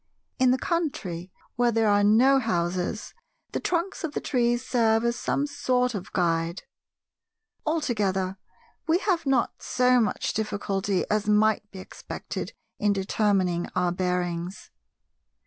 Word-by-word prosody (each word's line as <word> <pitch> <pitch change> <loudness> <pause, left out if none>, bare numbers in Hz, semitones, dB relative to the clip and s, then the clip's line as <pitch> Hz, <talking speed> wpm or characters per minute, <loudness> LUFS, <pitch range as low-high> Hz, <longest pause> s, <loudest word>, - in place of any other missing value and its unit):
In 255 -1 +5
the 255 - +3
country, 210 - -3 0.3
where 240 0 +3
there 225 -1 +2
are 205 0 +4
no 250 +6 +5
houses, 180 -2 -2 0.4
the - - -2
trunks 350 +2 -2
of 315 -3 -3
the - - -1
trees 240 -1 0
serve 225 -2 +2
as 235 0 +1
some 280 - -1
sort 255 -4 0
of 195 -3 -6
guide. 170 0 0 1.0
Altogether, 205 - 0 0.5
we 325 +2 +4
have 360 -5 0
not 265 -3 +2
so 250 0 +3
much 225 - 0
difficulty 200 -2 -1
as 210 0 +1
might 210 0 +3
be 195 - -12
expected 185 - -7 0.3
in 205 -1 +2
determining 190 -3 +1
our 180 -1 +2
bearings. 180 0 -2
215 Hz, 130 wpm, -26 LUFS, 185-250 Hz, 1.0 s, In